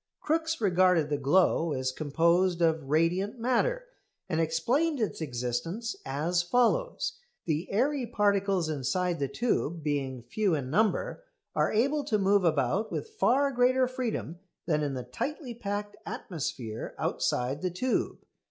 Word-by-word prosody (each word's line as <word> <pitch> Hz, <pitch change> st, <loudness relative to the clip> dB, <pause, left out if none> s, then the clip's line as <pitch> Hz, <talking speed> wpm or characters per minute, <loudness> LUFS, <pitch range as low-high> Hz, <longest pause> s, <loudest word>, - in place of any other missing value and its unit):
Crookes 320 Hz, +1 st, 0 dB
regarded 180 Hz, -6 st, +3 dB
the 145 Hz, -, +2 dB
glow 165 Hz, +2 st, +3 dB
as 130 Hz, -1 st, -1 dB
composed 170 Hz, +5 st, +2 dB
of 160 Hz, -4 st, +1 dB
"radiant 175 Hz, -, +1 dB
matter," -, -, +1 dB, 0.4 s
and 165 Hz, -3 st, 0 dB
explained 245 Hz, -, +1 dB
its 215 Hz, -6 st, -2 dB
existence 140 Hz, -, -3 dB
as 160 Hz, +6 st, 0 dB
follows. 250 Hz, -, +1 dB, 0.3 s
The 160 Hz, +2 st, -2 dB
airy 255 Hz, +4 st, +1 dB
particles 200 Hz, -5 st, +1 dB
inside 155 Hz, +5 st, -1 dB
the 140 Hz, -, 0 dB
tube, 175 Hz, -, -1 dB
being 135 Hz, -4 st, -2 dB
few 190 Hz, -, 0 dB
in 135 Hz, -3 st, -4 dB
number, 220 Hz, -, +1 dB, 0.3 s
are -, -, +1 dB
able 280 Hz, +7 st, +2 dB
to 215 Hz, -, +1 dB
move 200 Hz, 0 st, +3 dB
about 160 Hz, -, +1 dB
with 450 Hz, -, -4 dB
far 280 Hz, -, +2 dB
greater 255 Hz, 0 st, +3 dB
freedom 245 Hz, -, -4 dB, 0.3 s
than 155 Hz, -3 st, +1 dB
in 145 Hz, -2 st, -1 dB
the 125 Hz, -, -4 dB
tightly 255 Hz, -, -4 dB
packed 205 Hz, -2 st, -4 dB
atmosphere 130 Hz, -, -5 dB
outside 130 Hz, +4 st, -1 dB
the 185 Hz, -, 0 dB
tube. 235 Hz, +9 st, -1 dB
180 Hz, 140 wpm, -29 LUFS, 150-235 Hz, 0.4 s, regarded